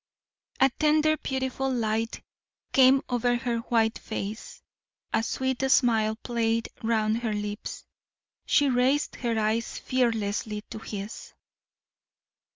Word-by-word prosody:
A 265 0 +5
tender 310 0 +4
beautiful 265 -1 -2
light 225 -2 -1 0.5
came 265 0 +6
over 245 0 +1
her 240 -1 -1
white 225 -1 +1
face, 215 0 -6 0.5
a - - +3
sweet 260 +2 -2
smile 220 -4 +3
played 230 0 -1
round 220 -1 +1
her 230 -3 -2
lips. 210 0 -5 0.6
She 290 - +4
raised 260 +3 +1
her 235 -2 -1
eyes 220 +1 0
fearlessly 220 -4 -1
to - - -6
his. 205 -1 -7
230 Hz, 110 wpm, -27 LUFS, 220-260 Hz, 0.6 s, came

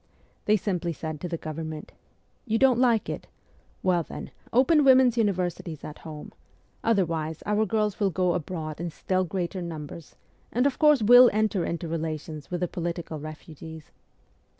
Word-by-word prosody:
They 215 +1 +4
simply 180 -4 -2
said 155 -1 -6
to 180 - -3
the 170 - -2
Government, 155 0 -6 0.3
' - - -41
You 225 0 +2
don't 255 -1 +4
like 235 -4 +3
it? - - -5 0.6
"Well, 180 -2 +3
then, - - -8 0.2
open 280 +5 +4
women's 260 -3 +6
universities 180 - -1
at 150 - -8
home; 155 -2 -9 0.5
otherwise 165 -7 0
our 210 +1 +1
girls 210 -1 0
will 200 -2 +2
go 180 0 +1
abroad 160 -2 -4
in 175 - -2
still 185 +3 -1
greater 180 +1 -3
numbers, 160 -2 -7 0.4
and 250 +3 +1
of 280 -2 0
course 300 -6 +5
will 245 +3 +9
enter 215 -3 +1
into 170 0 -3
relations 155 -2 -4
with 175 -1 -3
the 180 - +1
political 170 -2 -4
refugees.' 155 +1 -10
175 Hz, 160 wpm, -26 LUFS, 160-215 Hz, 0.6 s, will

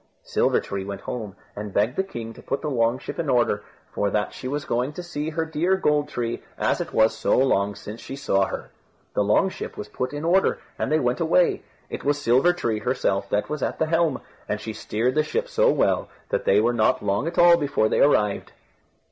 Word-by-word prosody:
Silver - - +2
tree, 100 -1 -4
went 100 0 -6
home, 105 -5 -5 0.2
and 105 -1 -6
begged 110 +5 +2
the - - +2
king 115 -12 -7
to - - -13
put 135 - -3
the 150 - -2
long 115 -1 +2
ship 135 - -7
in 160 -4 -1
order, 120 -5 +2 0.3
for 100 - 0
that 105 +1 -1
she 130 - -7
was 145 +2 -3
going 125 +5 -1
to 180 - -6
see 160 -3 -4
her 160 +1 -2
dear 165 +4 +1
Gold 150 -4 +1
tree, 120 -4 -3 0.2
as - - +1
it - - -5
was 110 0 +3
so 110 - +1
long 100 -6 +2
since 105 +3 -9
she 135 - -7
saw 100 -8 +1
her. - - -6 0.4
The 105 - +2
long 105 - +3
ship - - -7
was 210 - -6
put 125 - -3
in 145 +2 -5
order, 185 +3 +3 0.2
and - - -1
they 155 - +4
went 125 -1 0
away. 170 +1 +3 0.3
It - - -6
was 145 0 +1
Silver 135 +5 +4
tree 115 -11 -2
herself 100 -4 -1
that 105 - 0
was 150 -2 -4
at - - -1
the 160 - +1
helm, 165 -2 +1 0.3
and 105 - -1
she 110 +1 -6
steered 115 +4 -1
the 155 - +3
ship 470 - -2
so - - +3
well - - +1 0.2
that - - -1
they - - +5
were 120 +3 +2
not 110 -2 +2
long 100 +9 0
at 170 - -4
all 175 0 +8
before 140 -8 +1
they - - +1
arrived. 105 -8 +2
130 Hz, 230 wpm, -24 LUFS, 110-160 Hz, 0.4 s, all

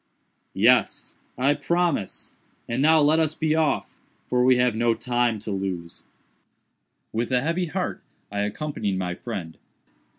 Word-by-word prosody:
"Yes; - - +3 0.2
I 135 +4 +3
promise; 170 - -1 0.3
and 120 +3 -1
now 160 +2 +5
let 150 +2 +4
us 155 -1 +1
be 155 -1 0
off, 160 -2 0 0.3
for 125 0 +1
we 130 0 +5
have 125 -2 +2
no 115 0 +2
time 120 -2 0
to 105 - -5
lose." 95 -3 -4 1.1
With 115 +2 -1
a 125 -1 +3
heavy 170 +5 -1
heart 180 +3 -3 0.3
I 100 - -3
accompanied 105 -1 -2
my 90 -1 -2
friend. 90 -5 -7
125 Hz, 140 wpm, -24 LUFS, 105-155 Hz, 1.1 s, now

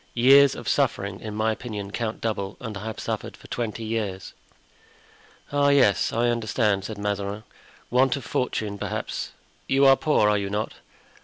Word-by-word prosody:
Years 135 +3 +6
of - - -8
suffering, 100 0 0
in 105 -1 -6
my 110 +1 +1
opinion, 105 -3 -5
count 110 0 -3
double, 105 -3 -3
and 110 -5 -6
I 100 +2 -6
have 110 -1 -5
suffered - - -4
for - - -18
twenty 115 -1 -3
years." 110 -4 -3 1.2
"Ah, 145 0 +3
yes, 140 -8 +4
I 120 +1 +1
understand," 110 -4 0
said 110 0 -6
Mazarin; 100 0 -3 0.5
"want 130 +1 +3
of 140 - -7
fortune, 105 -5 -2
perhaps. - - -4 0.4
You 135 +1 +4
are 135 0 +8
poor, 150 -8 +2
are 105 -1 +3
you 100 -1 -3
not?" 105 +2 -2
110 Hz, 165 wpm, -25 LUFS, 100-125 Hz, 1.2 s, are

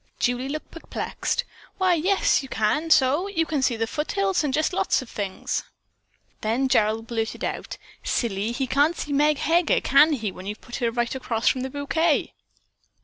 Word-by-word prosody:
Julie 245 +2 0
looked 305 +2 -5
perplexed. 330 - -3 0.3
"Why, 370 -1 +3
yes, 390 +8 +2
you 270 - -9
can 285 +10 0
so! 295 +4 +4
You 330 -5 0
can 305 -3 -1
see 250 -2 +2
the 225 0 -1
foothills, 380 - -1
and 290 - 0
just 310 +6 +1
lots 360 - +1
of 245 - -14
things." 195 -2 -3 0.8
Then 235 +5 +1
Gerald 220 -2 +2
blurted 225 -1 -3
out, - - -4 0.3
"Silly, 215 -2 -1
he 265 +3 -1
can't 285 +6 +2
see 290 - -4
Meg 295 +1 +3
Heger, 335 +2 +2
can 295 +4 +5
he, 220 -7 -2
when 185 +1 -10
you've 210 +1 -5
put 240 - -7
her 235 - 0
right 240 0 -1
across 235 -3 -2
from 255 - -1
the 260 - -3
bouquet?" 290 +3 0
270 Hz, 180 wpm, -24 LUFS, 230-315 Hz, 0.8 s, can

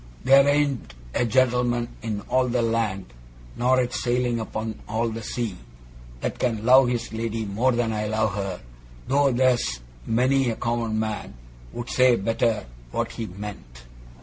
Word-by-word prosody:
There 135 +1 +6
ain't 145 - +1 0.2
a 120 - +1
gent'lman 120 0 +2
in 110 -3 -3
all 130 +4 +1
the 120 -1 +1
land 110 - -1 0.4
nor 130 +2 +3
yet 125 0 -1
sailing 120 -1 0
upon 110 0 -4
all 115 +2 0
the 115 +1 -5
sea 115 -2 -3 0.7
that - - -3
can 115 -3 -1
love 130 +1 +7
his 120 -2 -2
lady 115 0 -2
more 110 +6 +1
than 120 -2 0
I 105 0 -2
love 110 -1 0
her, 100 -2 -4 0.5
though 140 0 +3
there's 125 - +2 0.3
many 130 +3 +2
a 115 - -1
common 115 -2 -1
man 110 -8 -3 0.4
would 120 0 -6
say 130 -1 +5
better 115 0 0 0.2
what - - -2
he 115 - -5
meant. 90 -12 -9
115 Hz, 155 wpm, -24 LUFS, 110-125 Hz, 0.7 s, love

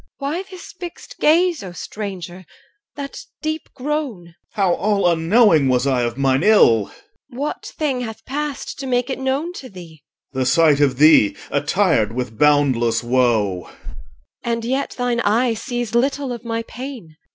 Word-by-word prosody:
EL. 280 0 -2
Why 345 +5 -2
this 370 -2 -10
fixed 350 -1 -10
gaze, 340 +2 +3
O 185 -3 -8
stranger! 185 -2 -7 0.5
that 280 -1 -6 0.2
deep 310 0 -3
groan? 270 - -3
OR. - - -21 0.2
How 195 -4 +2
all 200 0 +1
unknowing 170 - +4
was 125 0 +2
I 130 -3 +2
of 120 0 -2
mine 135 0 +2
ill! 120 - +5 0.4
EL. 240 - -11
What 290 +3 -4
thing 275 -5 -1
hath 225 -3 -7
passed 290 0 -4
to 270 - -5
make 250 +1 0
it 265 - -3
known 270 +6 -1
to 265 -7 -9
thee? 170 -5 -12 0.3
OR. 130 - -3
The 130 - +1
sight 155 -1 +4
of 135 -3 +2
thee 135 -10 +5
attired 145 - +1
with 125 -3 -5
boundless 130 -6 +3
woe. 120 -7 +1
EL. - - -16 0.7
And 230 -1 -2
yet 265 +3 -2
thine 245 -1 0
eye 230 +2 +2
sees 240 0 -4
little 270 +2 0
of 235 - -8
my 230 -1 -3
pain. 240 - -9
210 Hz, 170 wpm, -20 LUFS, -, 0.7 s, ill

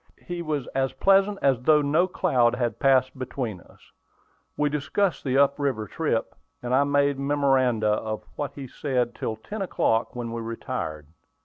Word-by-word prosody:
He 175 -1 -4
was 150 -5 -2
as 135 0 0
pleasant 195 +1 +3
as 135 -3 +3
though 150 +3 +4
no 155 +6 +2
cloud 130 -10 +2
had 120 -3 -2
passed 130 -1 +3
between 120 -7 -4
us. - - -21 0.7
We 150 - +2
discussed 150 +4 -1
the 135 -1 0
up 140 0 +3
river 130 -7 -1
trip, 130 -3 -2 0.3
and 120 +1 -2
I 140 +2 +4
made 140 -1 +2
memoranda 135 -5 +2
of 110 +1 -2
what 145 -1 -4
he 140 - -7
said 125 -3 -1
till 110 - -3
ten 200 - -7
o'clock, 115 -12 0
when 120 -1 -4
we 115 0 -4
retired. 80 -9 -5
135 Hz, 170 wpm, -25 LUFS, 120-145 Hz, 0.7 s, though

